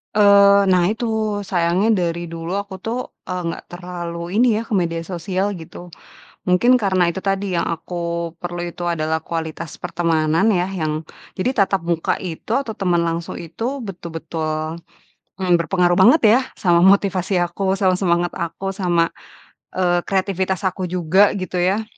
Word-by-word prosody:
Eee, 200 -1 +6
nah 185 -1 +4
itu, 225 +2 -3 0.3
sayangnya 185 +1 +1 0.2
dari 170 +1 -6
dulu 165 +1 -6
aku 200 -1 -7
tuh, 230 +2 -2 0.3
eee, 180 -2 -4
nggak 165 - -5
terlalu 175 0 -6
ini 230 -1 +4
ya, - - -2
ke - - -5
media 170 -3 0
sosial, 190 +2 -2
gitu. 175 +1 -10 0.6
Mungkin, 195 +8 +4
karena 185 -3 +2
itu 180 +3 -2
tadi, 195 -1 -1
yang 170 - +1
aku 170 +2 -4 0.5
perlu 175 0 -4
itu 175 0 -7
adalah 160 -1 -1
kualitas 165 0 -5
pertemanan 165 +3 +1
ya, 180 -3 +1
yang, 155 -5 -3 0.3
jadi 220 +1 +2
tatap 195 -1 0
muka 170 -1 0
itu 170 -4 -7
atau 230 -6 -4
teman 175 -3 +1
langsung 165 0 -3
itu 225 - -4
betul-betul, 165 -2 -4 0.5
mmm, 185 -2 0
berpengaruh 175 +1 +2
banget 295 +8 +7
ya, 245 - +5 0.2
sama 175 -3 +3
motivasi 190 0 +3
aku, 190 +2 -1
sama 190 -1 +2
semangat 175 -2 +1
aku, 195 +3 -4
sama, 175 -4 +1 0.6
eee, 175 -1 +2
kreativitas 190 -1 -1
aku 185 -1 -1
juga, 185 +4 +3
gitu 185 -2 -3
ya. 190 +5 +1
180 Hz, 155 wpm, -20 LUFS, 170-195 Hz, 0.6 s, banget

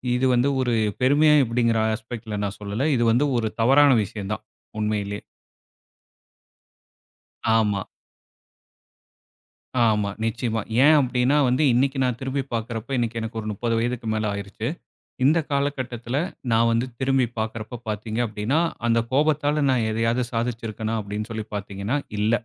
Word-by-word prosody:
இது 125 +2 +1
வந்து 125 +3 +3
ஒரு 125 -2 0 0.3
பெருமையா? 150 +3 +5
எப்படிங்கிற 115 -1 +1 0.2
ஆஸ்பெக்ட்ல 110 -1 -6
நான் 100 0 -3
சொல்லல. 105 +7 -2
இது 120 - +1
வந்து 125 +6 +3
ஒரு 110 - 0
தவறான 140 +4 +6
விஷயம் 100 0 -6
தான். 110 - -6 0.4
உண்மையிலே. 105 -1 -1 2.4
ஆமா. 105 -3 +1 2.0
ஆமா. 105 -2 +1
நிச்சயமா. 115 0 -1 0.2
ஏன் 155 +1 +7
அப்டினா, 125 +1 +2
வந்து 130 +5 +2
இன்னிக்கி 135 +3 +1
நான் 125 -2 -1
திரும்பி 135 +1 -2
பாக்கிறப்ப, 115 +3 -3
இன்னிக்கு 115 -1 -1
எனக்கு 115 0 -5
ஒரு 110 - -6
30 115 +3 -1
வயதுக்கு 120 0 -2
மேல 110 0 -1
ஆயிருச்சு. 100 +3 -5 0.6
இந்த 155 +5 +5
காலகட்டத்தில 130 -3 -2 0.3
நான் 115 +1 +4
வந்து 115 +2 +1
திரும்பி 135 -1 +2
பாக்குரப்ப 110 +2 -4
பாத்தீங்க 110 +2 -3
அப்படினா, 110 +8 0 0.3
அந்த 115 0 +3
கோபத்தால 150 +1 +2
நான் 120 -4 +2
எதையாவது 115 +3 +1
சாதிச்சு 115 0 -2
இருக்கனா? 110 +1 -3
அப்படினு 105 +2 -5
சொல்லி 110 -1 -4
பாத்தீங்கனா, 100 +5 -3 0.2
இல்ல. 105 +2 +2
115 Hz, 135 wpm, -24 LUFS, 110-130 Hz, 2.4 s, ஏன்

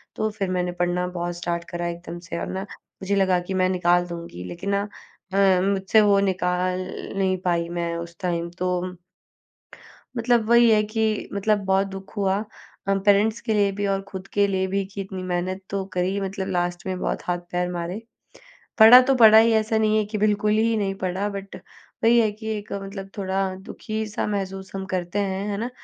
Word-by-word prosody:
तो 215 0 0
फिर 200 -3 -3
मैंने 180 -1 -1
पढ़ना 175 0 0
बहुत 175 -1 -4
स्टार्ट 170 0 -3
करा 175 0 -3
एकदम 170 0 -6
से 170 -1 -6
और - - -4
ना, 190 - -4 0.4
मुझे 200 +1 0
लगा 190 -2 +3
कि 175 +2 -5
मैं 185 0 +2
निकाल 175 -1 +2
दूँगी। 170 - -7
लेकिन 90 - -6
ना 200 - +1 0.5
अ, 195 -2 +4
मुझसे 195 +2 +3
वो 200 -1 +4
निकाल 185 -1 0 0.4
नहीं 190 -1 +1
पाई, 170 -1 +1
मैं 170 -1 -2
उस 170 0 -8
टाइम 170 -2 -2
तो 180 0 -2 1.2
मतलब 235 -1 +2
वही 235 0 +6
है 215 -1 +5
कि 215 0 -1
मतलब 205 +1 +1
बहुत 195 +1 +2
दुख 195 +1 -10
हुआ 195 -1 +1 0.5
अम, 195 0 +2
पेरेंट्स 205 +3 +3
के 225 -2 -1
लिए 205 -1 +3
भी 205 +1 -3
और 195 0 0
खुद 190 -1 -7
के 205 0 +4
लिए 190 -1 0
भी 195 +1 0
कि 195 +1 -7
इतनी 190 -1 -6
मेहनत 185 +1 -2
तो 195 -1 -2
करी, 185 +2 0
मतलब 195 0 -3
लास्ट 175 -2 -2
में 185 - -2
बहुत - - -2
हाथ-पैर 175 0 -2
मारे। 175 +4 -4 0.8
पढ़ा 225 +3 +11
तो 270 +1 +2
पढ़ा 220 -3 +8
ही, 230 +1 +6
ऐसा 220 0 +1
नहीं 215 0 +2
है 215 - +2
कि 210 +1 -4
बिल्कुल 210 0 +2
ही 225 +2 +2
नहीं 195 -2 0
पढ़ा, 190 +1 -2
बट 195 -1 -7 0.5
वही 235 +1 +6
है 220 -2 +3
कि 220 +1 -9
एक 205 0 -9
मतलब 195 0 -6
थोड़ा 190 -1 -1 0.2
दुखी-सा 215 -1 -4
महसूस 195 -1 -4
हम 190 0 -4
करते 180 +2 -2
हैं। 195 0 -2
है 200 - -2
ना? 230 +4 -3
195 Hz, 195 wpm, -24 LUFS, 180-205 Hz, 1.2 s, पढ़ा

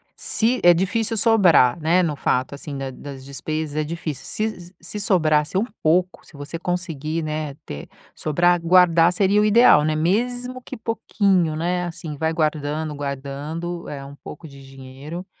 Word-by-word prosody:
se 235 +3 +1
é 175 0 +8
difícil 225 +5 0
sobrar, 185 - +4
né, 175 +4 +3
no 155 -3 -1
fato, 130 0 -1
assim, 140 0 -7
da 135 -1 -4
das 135 0 -10
despesas 155 +2 -4
é 155 - 0
difícil, 155 -3 -5
se 215 - -2
s 175 +1 -14
se 190 +5 -7
sobrasse 160 -5 +2
um 215 - +1 0.2
pouco, 180 +4 +1
se - - -19
você 145 +4 -6
conseguir, 165 -3 -3
né, 155 -2 -4
ter 70 - -8 0.3
sobrar, 175 +3 +2
guardar, 170 -1 +5
seria 200 +3 +2
o - - +3
ideal, 215 -8 +6
né, 155 0 0
mesmo 245 +9 -1
que 260 - -9
pouquinho, 200 -7 0
né, 175 +2 -1
assim, 165 -3 -6
vai 160 +2 -1
guardando, 155 -1 -1
guardando, 145 +5 -5
eh, 140 -1 -7
um 140 +1 -11
pouco 155 +2 -11
de 140 -1 -14
dinheiro, 135 +6 -9
165 Hz, 170 wpm, -22 LUFS, 145-185 Hz, 0.3 s, é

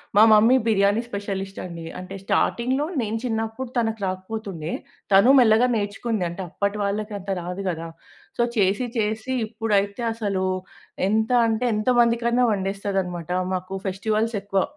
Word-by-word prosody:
మా 210 - +8
mummy 225 +4 +6
biryani 205 0 +3
specialist 195 -2 -5
అండి. 170 -2 -7
అంటే 185 +2 -8
స్టార్టింగ్‌లో 260 +8 +1 0.2
నేను 220 0 -2
చిన్నప్పుడు 225 +1 -3
తనకి 225 -2 0
రాకపోతుండే. 185 -3 -4 0.4
తనూ 200 +7 +7
మెల్లగా 230 +1 +5
నేర్చుకుంది. 205 0 -2
అంటే 175 +3 -6
అప్పటి 200 +3 -2
వాళ్ళకి 210 +1 -2
అంత 195 +1 -10
రాదు 180 +3 -5
గదా! 165 -1 -4 0.5
సో, - - +1
చేసీ, 205 +4 +2
చేసీ 220 +4 -1
ఇప్పుడైతే 210 -1 -1
అసలూ 200 -4 -1 0.6
ఎంత 220 +3 +1 0.2
అంటే 225 +2 0
ఎంత 215 +3 -3
మందికైనా 235 +1 +3
వండేస్తదనమాటా. 190 -3 -2 0.2
మాకు 185 +1 -3
ఫెస్టివల్స్ 215 +4 -1
ఎక్కువ. 195 -1 0
210 Hz, 135 wpm, -24 LUFS, 195-225 Hz, 0.6 s, మా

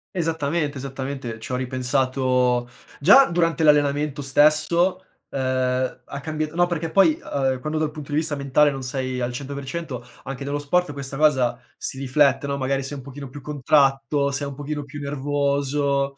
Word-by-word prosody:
Esattamente, 160 -3 -1
esattamente. 135 -3 -5
C'ho 125 +3 -5
ripensato 130 -1 +1 0.3
già 205 - +8
durante 170 -1 +1
l'allenamento 145 -1 +3
stesso, 155 +6 +3 0.3
ehm, 130 -1 -1
ha 140 - -7
cambiat 155 +1 -3
no, 175 +1 +3
perché 170 -2 -3
poi, 305 - +4
ehm, 135 -2 -1
quando 155 +3 -3
dal 155 -1 0
punto 150 -2 -9
di 145 - +1
vista 155 -2 0
mentale 140 +1 +3
non 135 -1 -5
sei 130 0 -3
al 120 0 -1
100%, 140 0 -5 0.2
anche 135 0 -6
nello 140 +1 -2
sport 145 +2 0
questa 140 -1 -6
cosa 135 -5 +2 0.2
si 135 - -5
riflette, 140 +1 +2
no, 140 0 -2
magari 135 0 0
sei 140 +2 -6
un 135 - -9
pochino 140 0 -9
più 145 +2 -10
contratto, 140 0 +2
sei 140 +1 -2
un 140 - -7
pochino 145 +1 -4
più 145 +1 -9
nervoso. 140 0 0
140 Hz, 165 wpm, -23 LUFS, 130-150 Hz, 0.3 s, già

